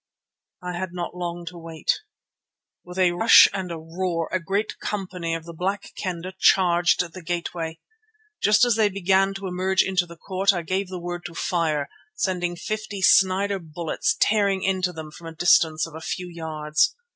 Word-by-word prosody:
I 180 0 -4
had 185 -2 -4
not 175 0 -5
long 175 -1 -5
to 175 0 -11
wait. 165 -1 -2 0.8
With 180 +1 -10
a 185 -2 +4
rush 225 +6 +8
and 190 -3 -4
a 165 - -4
roar 165 +1 -3
a 185 - +1
great 195 +5 -2
company 180 -5 -3
of 165 -1 -7
the 170 - -9
Black 195 +5 -3
Kendah 185 0 -4
charged 175 -2 +3
the 185 - -8
gateway. 170 -1 -4 0.6
Just 215 +3 +5
as 240 -3 +2
they 215 -2 +4
began 195 0 +2
to 195 0 -6
emerge 185 +1 +1
into 185 -2 0
the 170 0 -12
court 190 +3 +1
I 175 -2 -3
gave 190 +3 -1
the 185 0 -6
word 175 0 -5
to 170 - -13
fire, 155 -5 0 0.3
sending 175 -2 -1
fifty 210 +2 -4
Snider 195 +2 +4
bullets 165 -1 -2
tearing 200 -3 +2
into 185 -1 +1
them 160 -2 -8
from 165 +2 -11
a 165 - -9
distance 165 -3 +4
of 165 - -11
a 160 - -8
few 180 +2 -4
yards. 155 -3 0
180 Hz, 180 wpm, -24 LUFS, 165-190 Hz, 0.8 s, rush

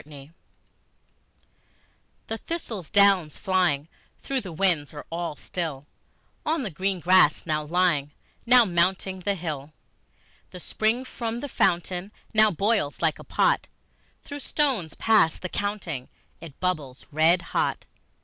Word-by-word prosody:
Autumn 145 0 -13 1.9
The 225 0 -5
thistle 280 - -4
down's 195 -3 +3
flying, 175 -6 +1 0.4
though 275 -1 -1
the 195 -7 -8
winds 160 -4 0
are 145 - -8
all 170 -2 -3
still, 150 -3 -5 0.6
On 320 -2 0
the 210 - -3
green 190 +3 -1
grass 180 -3 +4
now 155 -1 -1
lying, 155 -3 +1 0.3
now 245 0 +6
mounting 185 +1 0
the 200 +2 -1
hill, 155 -4 -5 0.8
The 180 - -10
spring 220 +7 0
from 235 -2 -4
the 285 - -4
fountain 185 -3 0 0.2
now 215 0 +6
boils 200 -4 0
like - - +2
a - - -9
pot; - - +1 0.6
Through 285 0 -7
stones 260 - -1
past 210 -8 +3
the 185 - -3
counting 180 -11 -3 0.3
it 160 -5 -12
bubbles 150 -8 -3
red 160 +4 +3
hot. - - 0
180 Hz, 130 wpm, -25 LUFS, 155-210 Hz, 1.9 s, now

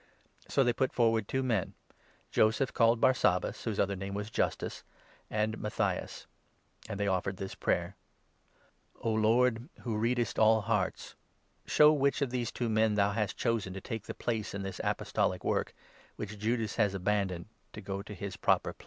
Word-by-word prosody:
So 135 - +3
they 120 -1 +2
put 130 +2 0
forward 115 -3 +2
two 130 0 -1
men, 115 -7 0 0.6
Joseph 110 +4 +2
called 115 -1 +4
Barsabas, 105 -9 +2
whose 110 -3 -2
23 - - +4
other 100 0 -2
name 95 +1 -5
was 105 +1 -4
Justus, - - -2 0.5
and 110 +1 -1
Matthias; 105 - -2 0.6
and 100 -2 -4
they 100 - +1
offered 95 0 0
this 95 0 -5
24 - - -17
prayer - - 0 0.6
— - - -37
"O 115 - +1
Lord, 115 +3 +2
who 115 -3 -2
readest 120 +2 0
all 110 0 +5
hearts, 105 -3 -1 0.5
show 150 0 +6
which 140 -1 +2
of 130 - -2
these 120 -2 -2
two 120 - -2
men 110 -1 +2
thou 100 -1 +3
hast 105 -2 -2
chosen 115 -6 0
to 95 - -6
take 110 -2 -5
the - - -5
place 110 -4 -2
in 100 - -4
this 95 -1 -5
apostolic - - 0
work, - - 0 0.4
which 105 - -5
25 105 -1 -10
Judas 110 -1 0
has 105 -4 +2
abandoned, 95 -2 -1 0.3
to - - -7
go 100 0 -4
to 105 0 -9
his 95 +1 -5
proper - - +2
place." - - -38
110 Hz, 185 wpm, -31 LUFS, 100-120 Hz, 0.6 s, show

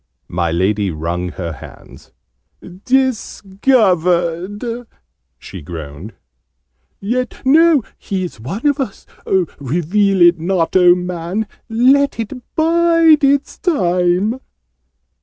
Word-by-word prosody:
My 85 -1 -1
Lady 100 +4 0
wrung 85 +2 -3
her 85 -3 -5
hands. 65 - -14 0.7
"Discovered!" 205 -4 0 0.5
she 95 - -10
groaned. 80 +4 -9 0.9
"Yet 245 +4 -3
no 310 0 +5 0.2
he 190 -2 -3
is 175 -10 -7
one 180 - -6
of 290 0 +2
us! 255 -8 -5 0.5
Reveal 175 - +1
it 175 -1 +5
not, 175 0 -1
oh 180 -1 +6
Man! 180 +3 -3 0.2
Let 265 +4 +3
it 225 +1 -4 0.2
bide 330 -1 +4
its 280 0 +1
time!" 185 - +1
190 Hz, 100 wpm, -17 LUFS, 165-255 Hz, 0.9 s, oh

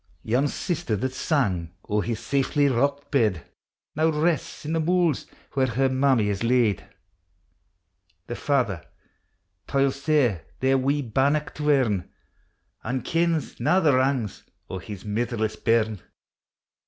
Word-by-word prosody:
Yon 125 +6 +1
sister 165 -5 -2
that 130 +6 -2
sang 100 - 0 0.2
o'er 105 0 +1
his 115 +1 -3
saftly 140 +3 +1
rocked 140 +2 0
bed 110 - +2 0.5
Now 160 +2 +3
rests 155 -2 -1
in 155 - -2
the 165 - +1
mools 170 -2 +1 0.2
where 135 -1 +1
her 130 +3 +1
mammie 130 -5 +2
is 100 +1 -2
laid; 120 -4 +2 1.4
The 120 - -5
father 120 - 0 0.8
toils 140 0 +1
sair 140 - +2 0.2
their 135 0 +3
wee 140 +2 +1
bannock 140 +6 +1
to 150 0 -2
earn, 115 -10 +2 0.7
An' 125 +1 -2
kens 165 -1 0
na 185 - +3
the 155 -6 +4
wrangs 130 -5 0 0.3
o' 95 - -4
his 100 +1 -9
mitherless 110 0 -1
bairn. 110 -4 +1
130 Hz, 130 wpm, -25 LUFS, 110-145 Hz, 1.4 s, the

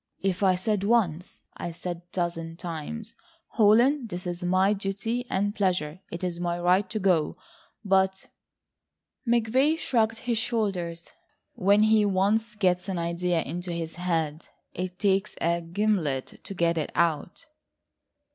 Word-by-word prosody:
"If 195 -1 0
I 190 -2 +4
said 200 +2 -1
once, 195 -6 0
I 175 - -4
said 175 +1 -5
a - - -18
dozen 165 -2 -3
times: 180 +7 -6 0.4
'Holland, 235 +3 +4
it 175 +1 -5
is 175 0 -4
my 185 +3 +3
duty 210 +5 -3
and 205 +2 0
pleasure, 185 -6 0
it 170 - -6
is 175 -1 -2
my 175 0 -1
right 185 +3 +3
to 215 - -3
go,' 185 -6 +2 0.5
but 190 0 +2 0.5
..." - - -37
McVay 245 +7 +3
shrugged 225 -7 +1
his 235 -1 -1
shoulders, 195 -8 -2 0.5
"when 200 +3 +4
he 215 0 +5
once 205 +3 +1
gets 185 -2 +1
an 190 - -2
idea 170 0 0
into 175 +4 -5
his 165 -1 -4
head, 165 -3 -2 0.3
it 180 0 -4
takes 195 0 +1
a 170 +1 +1
gimlet 170 -6 -1
to 195 - -7
get 170 -1 +1
it 155 - -3
out." 170 - 0
185 Hz, 145 wpm, -27 LUFS, 170-210 Hz, 0.5 s, he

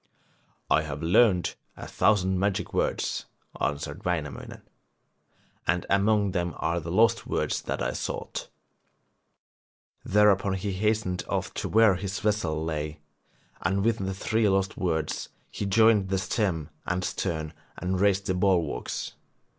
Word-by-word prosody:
'I - - +5
have 75 0 -5
learned 90 +1 +4 0.2
a - - -7
thousand 95 -3 +2
magic 100 0 -1
words,' - - -1 0.3
answered 75 +1 -2
Wainamoinen, 80 -5 -4 1.0
'and 85 +1 +1
among 100 0 +3
them 85 -2 -2
are 85 +1 0
the 85 0 -7
lost 115 +5 +3
words - - -1
that - - -3
I - - -1
sought.' - - -4 1.5
Thereupon 100 -1 +3
he 100 +1 -3
hastened 105 -1 0
off - - -2
to - - -3
where 110 -4 +5
his 95 +1 -4
vessel 90 -7 0
lay, 75 -1 -3 0.6
and 95 +3 0
with 115 -1 +2
the 95 0 -2
three 110 +2 +1
lost 95 0 +1
words 80 -4 -2 0.2
he 100 - -3
joined 105 -1 +4
the 95 - +1
stem 90 -6 -1 0.2
and 90 0 -1
stern 80 -4 -3 0.2
and 90 +1 -1
raised 100 -1 +3
the 95 - 0
bulwarks. 90 -4 0
95 Hz, 135 wpm, -27 LUFS, 85-105 Hz, 1.5 s, I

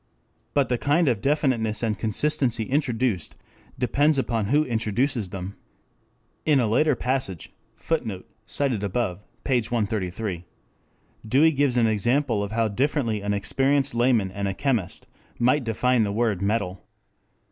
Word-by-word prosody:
But 140 -2 +2
the 125 -2 0
kind 150 +3 +2
of 115 -6 +1
definiteness 130 -6 +1
and 110 -2 +1
consistency 115 +2 0
introduced 125 - -1 0.4
depends 145 +4 +2
upon 115 -5 0
who 150 +6 +3
introduces 115 -1 -1
them. 95 +1 -6 0.9
In 150 -3 +3
a 120 - +2
later 140 +7 +2
passage 125 -9 -2 0.2
[Footnote: 110 - -3
op. - - -27 0.2
cit., 140 -2 0
p. 105 +4 -2
133.] 100 -5 -2 0.8
Dewey 145 +8 +5
gives 140 -4 +1
an 120 - +4
example 115 +2 +1
of 100 0 -4
how 115 0 +1
differently 115 -1 0
an 100 0 -1
experienced 135 +7 +1
layman 120 -5 +2
and 100 0 -3
a 95 - -3
chemist 120 -7 -1 0.3
might 130 +4 +2
define 120 +2 +1
the 105 -2 0
word 105 -3 0
metal. 100 -3 -1
115 Hz, 135 wpm, -24 LUFS, 105-135 Hz, 0.9 s, Dewey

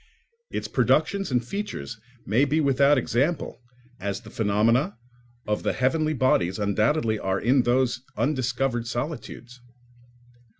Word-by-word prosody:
Its - - -4
productions 200 -1 +1
and 125 -2 0
features 200 - -5 0.3
may 115 +7 +2
be 145 +3 +1
without 140 0 +4
example, 135 +4 -1 0.4
as 100 0 -3
the - - -13
phenomena 110 +1 +1 0.5
of 105 0 -1
the - - 0
heavenly 155 +4 +1
bodies 95 -9 +2
undoubtedly 110 +3 +1
are 95 0 -1
in 130 +4 +3
those 120 0 +1 0.2
undiscovered 130 -3 0
solitudes. 125 -1 -6
125 Hz, 120 wpm, -25 LUFS, 110-140 Hz, 0.5 s, without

